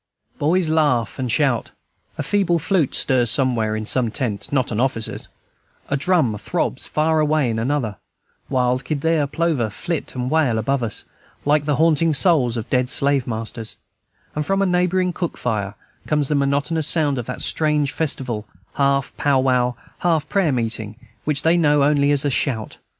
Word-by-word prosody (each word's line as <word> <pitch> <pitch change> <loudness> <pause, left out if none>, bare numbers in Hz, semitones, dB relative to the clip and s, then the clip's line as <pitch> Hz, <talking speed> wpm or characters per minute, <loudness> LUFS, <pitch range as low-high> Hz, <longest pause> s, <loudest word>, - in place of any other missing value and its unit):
Boys 170 +4 +2
laugh 145 -9 +1
and 125 -2 -1
shout, 120 0 +1 0.5
a - - -2
feeble 195 -4 +1
flute 165 -2 0
stirs 125 -3 +3
somewhere 115 -4 +1
in 110 0 -4
some 120 +1 +1
tent, 105 -5 -3
not 130 -4 0
an 110 - -1
officer's, 125 -3 -2 0.6
a 140 - +1
drum 140 - +1
throbs 105 - -2
far 155 +1 +1
away 150 -4 +2
in 110 - -2
another, 115 -4 -1 0.5
wild 125 0 +1
kildeer 155 +2 0
plover 155 -6 0
flit 165 +9 -4
and 125 0 -2
wail 150 -8 +2
above 135 +4 0
us, 115 -3 -4 0.4
like 145 0 +2
the 145 -1 +1
haunting 160 0 +3
souls 135 -7 +3
of 115 +1 -4
dead 125 -1 +1
slave 140 -2 +2
masters, 115 0 -5 0.6
and 150 - -1
from 195 +5 +1
a - - +2
neighboring 180 0 +1
cook 175 -1 -4
fire 105 -4 -2 0.3
comes 150 -2 +1
the - - +1
monotonous 145 +2 0
sound 145 -6 +2
of 120 - -6
that 125 - -5
strange 150 -3 +1
festival, 130 -8 -2 0.3
half 140 -1 +1
pow 140 -2 +2
wow, 125 -2 +1 0.2
half 160 -3 +1
prayer 190 -4 +1
meeting, 110 -3 -2 0.3
which 145 -1 0
they 165 +2 +4
know 150 -4 +3
only 145 0 +3
as 145 0 +2
a 145 - +1
"shout." 120 -5 -1
140 Hz, 170 wpm, -21 LUFS, 120-155 Hz, 0.6 s, they